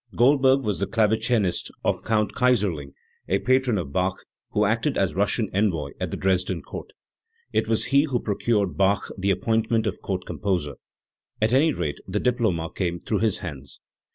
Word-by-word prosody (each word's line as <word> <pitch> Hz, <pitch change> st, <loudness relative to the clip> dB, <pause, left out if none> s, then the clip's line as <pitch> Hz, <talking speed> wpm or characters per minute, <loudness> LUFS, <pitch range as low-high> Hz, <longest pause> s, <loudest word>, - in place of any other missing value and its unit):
Goldberg 135 Hz, +1 st, +4 dB
was 105 Hz, -4 st, -1 dB
the 100 Hz, -, -1 dB
clave 110 Hz, -1 st, +2 dB
cinist 110 Hz, -7 st, +1 dB
of -, -, 0 dB
Count 105 Hz, -2 st, +1 dB
Kayserling, 100 Hz, -, +1 dB, 0.3 s
a 95 Hz, -, +2 dB
patron 130 Hz, 0 st, +2 dB
of 80 Hz, -7 st, -4 dB
Bach, 90 Hz, 0 st, -1 dB, 0.2 s
who -, -, +1 dB
acted -, -, 0 dB
as -, -, +1 dB
Russian -, -, +1 dB
envoy 90 Hz, -8 st, 0 dB
at -, -, -2 dB
the -, -, -4 dB
Dresden 95 Hz, -1 st, 0 dB
Court. -, -, -8 dB, 0.6 s
It -, -, +1 dB
was 110 Hz, -1 st, +1 dB
he 140 Hz, +2 st, +4 dB
who 130 Hz, -5 st, -1 dB
procured 100 Hz, -5 st, 0 dB
Bach 100 Hz, +1 st, +2 dB
the 95 Hz, 0 st, -1 dB
appointment 110 Hz, +3 st, +1 dB
of -, -, -3 dB
Court 95 Hz, -2 st, -3 dB
Composer; 90 Hz, -8 st, -2 dB, 0.6 s
at 110 Hz, +2 st, +2 dB
any 150 Hz, +5 st, +4 dB
rate 80 Hz, -, -3 dB
the 100 Hz, +2 st, -1 dB
diploma 110 Hz, -10 st, 0 dB
came 85 Hz, -2 st, -1 dB
through 105 Hz, +2 st, -1 dB
his 110 Hz, -2 st, +1 dB
hands. 70 Hz, -5 st, -8 dB
105 Hz, 175 wpm, -24 LUFS, 90-115 Hz, 0.6 s, Goldberg